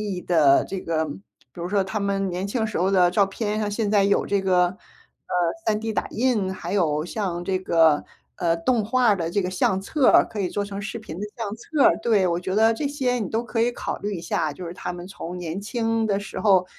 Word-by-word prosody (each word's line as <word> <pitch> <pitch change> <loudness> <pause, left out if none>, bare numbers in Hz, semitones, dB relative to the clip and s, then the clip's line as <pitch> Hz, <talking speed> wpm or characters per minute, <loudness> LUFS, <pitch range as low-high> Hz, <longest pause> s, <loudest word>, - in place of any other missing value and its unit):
义 180 - -5
的 150 -6 +4
这 190 -1 -5
个 160 -1 -1
比 145 - -5 0.4
如 175 0 -5
说 200 -1 +2
他 205 +3 -3
们 195 -1 -1
年 185 +3 -3
轻 220 +2 -1
时 215 - -6
候 185 +2 +2
的 180 -2 +4
照 195 +1 +3
片， 210 +1 -2
像 210 - -1
现 210 0 -1
在 205 -2 +4
有 200 0 +2
这 200 -1 0
个， 180 -1 +2 0.9
呃 - - +5
，3D 220 +1 -3
打 - - -1
印， 225 -6 0
还 185 0 -5
有 155 -5 +1
像 175 -3 -3
这 190 -1 0
个， 165 -5 +3 0.3
呃， 170 -2 +1
动 225 +6 +1
画 245 +2 +2
儿 205 - +4
的 165 -1 -2
这 200 +2 0
个 180 - -2
相 190 +1 +1
册 265 +7 +1
儿， - - +6
可 215 - -7
以 185 -3 0
做 205 0 -2
成 200 0 -6
视 215 +3 -5
频 215 -8 -8
的 210 - -4
相 215 -2 -4
册 285 +5 0
儿 - - +6
对， 215 -5 +3
我 170 0 0
觉 185 +2 -3
得 225 +1 +5
这 285 +5 -2
些 260 -4 -1
你 205 -6 -3
都 225 +2 -1
可 230 -1 -2
以 240 +1 +2
考 - - -4
虑 205 -1 -3
一 165 - -6
下。 155 -2 -1
就 180 +4 -8
是 170 - -6
他 180 - -5
们 175 0 -8
从 180 -2 -7
年 175 +2 -5
轻 225 0 -1
的 200 -1 +1
时 205 - -7
候， 190 -4 +4
195 Hz, 270 characters per minute, -24 LUFS, 180-220 Hz, 0.9 s, 儿